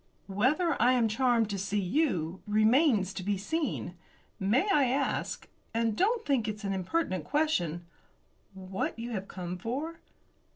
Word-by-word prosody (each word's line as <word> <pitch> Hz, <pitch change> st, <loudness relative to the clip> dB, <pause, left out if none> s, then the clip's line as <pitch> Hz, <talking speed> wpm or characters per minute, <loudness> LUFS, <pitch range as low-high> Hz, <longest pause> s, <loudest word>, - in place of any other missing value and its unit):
"Whether 265 Hz, -, +1 dB
I 250 Hz, +2 st, +5 dB
am 240 Hz, -3 st, +3 dB
charmed 230 Hz, -1 st, +2 dB
to 200 Hz, -, -2 dB
see 200 Hz, +2 st, -1 dB
you 185 Hz, -, 0 dB
remains 215 Hz, -, +3 dB
to -, -, -5 dB
be 200 Hz, +2 st, -1 dB
seen. 280 Hz, -, -2 dB, 0.5 s
May 220 Hz, -, +2 dB
I 290 Hz, -7 st, +4 dB
ask 270 Hz, +3 st, -1 dB, 0.3 s
and 230 Hz, -2 st, +1 dB
don't 450 Hz, -, +1 dB
think 260 Hz, -6 st, +1 dB
it's 215 Hz, 0 st, -4 dB
an 195 Hz, -1 st, -1 dB
impertinent 185 Hz, -, -1 dB
question 175 Hz, -, 0 dB, 0.7 s
what 190 Hz, +2 st, -4 dB
you 235 Hz, +1 st, -5 dB
have 195 Hz, -3 st, -4 dB
come 180 Hz, -1 st, -6 dB
for?" 285 Hz, -, -4 dB
220 Hz, 150 wpm, -30 LUFS, 190-275 Hz, 0.7 s, I